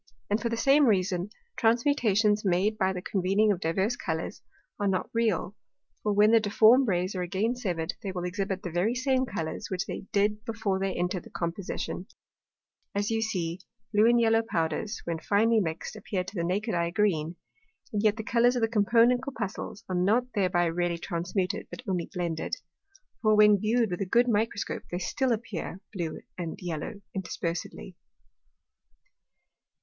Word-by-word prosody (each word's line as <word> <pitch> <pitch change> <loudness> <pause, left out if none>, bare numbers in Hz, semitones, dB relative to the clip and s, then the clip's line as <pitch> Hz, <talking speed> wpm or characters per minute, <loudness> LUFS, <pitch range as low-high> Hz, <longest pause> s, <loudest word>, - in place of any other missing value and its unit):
And 210 - +2
for 235 - 0
the 230 - -2
same 275 +4 +5
reason, 185 -2 +1 0.3
Transmutations 225 -4 +2
made 195 +3 +2
by 190 -2 +1
the 180 -1 -5
convening 200 +3 +2
of 190 - -1
divers 190 +8 0
Colours 160 -2 -4 0.4
are 205 - +1
not 185 -2 -1
real; 215 -4 0 0.5
for 210 - 0
when 210 +1 +5
the 230 -1 +6
difform 225 +5 +5
Rays 185 -1 0
are 185 - -3
again 195 +7 0
severed, 180 -8 -2
they 195 - -4
will 180 -1 -4
exhibit 190 +1 -2
the 175 - -4
very 185 +8 +1
same 260 0 +1
Colours, 165 -8 -4
which 185 -1 -2
they 190 - -6
did 210 +1 +1
before 205 -4 -1
they 195 0 0
entered 180 +1 -1
the - - -11
Composition; 180 +2 -4 0.9
as 205 +2 0
you 225 0 +1
see, 180 -6 -2 0.3
Blue 210 +2 +5
and 240 0 +5
Yellow 225 -1 +4
Powders, 180 +1 -2
when 165 -1 -2
finely 220 +5 +3
mixed, 165 +1 -3
appear 200 -3 -3
to 185 - -9
the 170 -5 -2
naked 200 +6 -1
Eye 170 -1 +1
Green, 175 -4 0 0.6
and 205 - +1
yet 215 0 +3
the 220 - -4
Colours 240 +3 +3
of 245 - 0
the - - +4
component 235 +3 +4
Corpuscles 225 -4 -5
are 185 - -4
not 225 +8 +2
thereby 180 -4 +2
really 170 +1 0
transmuted, 180 +5 -2
but - - -9
only 180 -3 -1
blended. 170 -4 -2 0.7
For, 215 -1 +4
when 210 -1 +6
viewed 225 +1 +1
with 175 - -3
a 195 - -1
good 240 +6 +4
Microscope, 220 -2 0
they 175 - -3
still 260 +8 0
appear 215 -5 -3
Blue 170 -5 -4 0.2
and 170 -2 -4
Yellow 180 +4 -5
interspersedly. 180 0 -4
200 Hz, 170 wpm, -28 LUFS, 180-225 Hz, 0.9 s, the